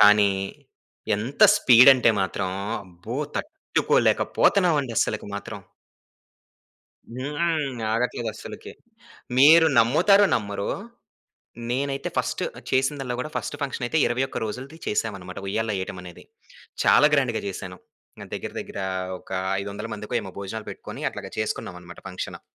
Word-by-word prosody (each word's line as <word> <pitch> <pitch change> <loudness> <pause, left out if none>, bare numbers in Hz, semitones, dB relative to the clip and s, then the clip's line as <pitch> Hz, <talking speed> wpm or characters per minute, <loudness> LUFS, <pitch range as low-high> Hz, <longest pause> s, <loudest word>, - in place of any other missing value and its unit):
కానీ 105 -1 +7 0.9
ఎంత 125 - -2
స్పీడ్ 125 - +8
అంటే 125 -2 +4
మాత్రం 95 0 -1 0.3
అబ్బో! 90 +6 -8 0.2
తట్టుకోలేక 310 0 +1 0.2
పోతన్నావండి 155 -10 +3
అస్సలకి 105 - -1
మాత్రం! 100 - -6 1.6
హ్మ్. 145 -1 -2
ఆగట్లేదు 120 0 -1
అస్సలకి. - - -9 0.7
మీరు 160 +5 +8
నమ్ముతారో 185 - +5
నమ్మరో! 100 -3 -3 1.0
నేనైతే 135 +2 -2
ఫస్ట్ - - -1 0.3
చేసిందాల్ల 135 -1 0
గూడా 130 - -3
ఫస్ట్ - - -4
ఫంక్షనయితే 135 0 -2
21 130 +3 -1
రోజులది 130 +8 -7
చేసామనమాట! 100 -4 -3
ఉయ్యాల్లో 110 +2 -1
ఏయ్యటమనేది. 90 -2 -7 0.6
చాలా 150 - +7
గ్రాండ్‌గా 130 -5 +1
చేశాను. 95 -1 -6 0.5
ఆహ్, - - -13
దగ్గర - - -4
దగ్గర - - -7 0.4
ఒక - - -17 0.3
500 100 +2 -5
మందికో 105 +3 -6
ఏమో 95 -2 -8
భోజనాలు 105 +2 -6
పెట్టుకొని - - -9
అట్లాగా - - -8
చేసుకున్నామనమాట 90 -4 -5
ఫంక్షను. 90 - -6
120 Hz, 110 wpm, -24 LUFS, 100-140 Hz, 1.6 s, స్పీడ్